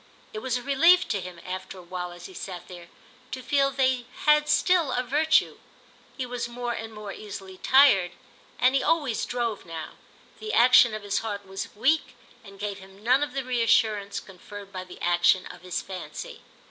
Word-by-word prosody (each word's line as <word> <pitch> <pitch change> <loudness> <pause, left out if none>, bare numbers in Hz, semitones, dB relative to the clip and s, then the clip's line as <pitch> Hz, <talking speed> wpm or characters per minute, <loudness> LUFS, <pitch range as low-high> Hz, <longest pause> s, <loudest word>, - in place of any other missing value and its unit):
It 215 - -4
was 250 +1 -1
a 245 - -7
relief 330 +7 +5
to 205 -3 -1
him, 180 -1 -9
after 185 +1 -6
a 180 - -11
while, 180 0 -5
as 175 0 -11
he 190 - -10
sat 180 0 -7
there, 175 -2 -11 0.4
to 255 - -6
feel 275 +1 +2
they 260 -2 0 0.2
had 300 0 +4
still 355 -6 +3
a 250 - 0
virtue. 305 +5 +2 0.6
He 260 - -2
was 245 -1 -4
more 240 0 -3
and 225 -1 -6
more 210 -2 -8
easily 195 -3 -9
tired, 195 -10 +5 0.4
and 255 +1 +4
he 275 - +2
always 290 -9 0
drove 235 -4 -2
now; 165 -2 -8 0.4
the 435 0 -5
action 240 -2 +6
of 215 - -7
his 200 -1 0
heart 205 -2 -5
was 195 +1 -7
weak 275 +6 +1 0.3
and 195 -2 -13
gave 205 -1 -4
him 195 +1 -16
none 255 +4 +4
of 290 -3 -2
the 270 -1 -2
reassurance 225 -5 +1
conferred 200 +1 -12
by 185 0 -6
the 180 - -12
action 175 +1 +3
of - - -11
his 180 0 -4
fancy. 180 -6 -8
215 Hz, 190 wpm, -26 LUFS, 190-260 Hz, 0.6 s, action